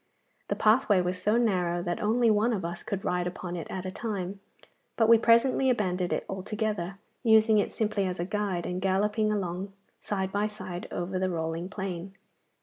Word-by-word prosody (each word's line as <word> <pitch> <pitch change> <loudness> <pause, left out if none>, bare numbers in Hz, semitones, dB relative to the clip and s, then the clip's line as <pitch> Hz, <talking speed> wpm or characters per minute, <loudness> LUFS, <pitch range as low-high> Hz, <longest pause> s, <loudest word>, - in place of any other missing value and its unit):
The - - -1
pathway 215 -2 +4
was 180 0 -2
so 210 +4 +2
narrow 180 -7 +1
that 175 -1 -2
only 230 +2 +3
one 215 +3 +2
of 190 -5 -2
us 170 0 -5
could 195 -1 -4
ride 180 0 0
upon 180 0 -5
it 170 - -6
at 190 0 -5
a 185 - -3
time, 200 -3 -4 0.6
but 225 - +4
we 230 0 +7
presently 240 +3 +4
abandoned 185 -7 0
it - - -1
altogether, 195 -1 -3 0.2
using 220 -2 +5
it - - 0
simply 210 -3 0
as 180 -1 -4
a 175 - -1
guide, 195 -3 -2
and 180 +1 -3
galloping 210 +3 +1
along 195 -1 -3 0.3
side 190 -2 -2
by 205 +1 +1
side 185 -4 -7
over 185 +1 -3
the 185 0 0
rolling 165 +1 -3
plain. 190 -2 -5
195 Hz, 185 wpm, -28 LUFS, 180-215 Hz, 0.6 s, we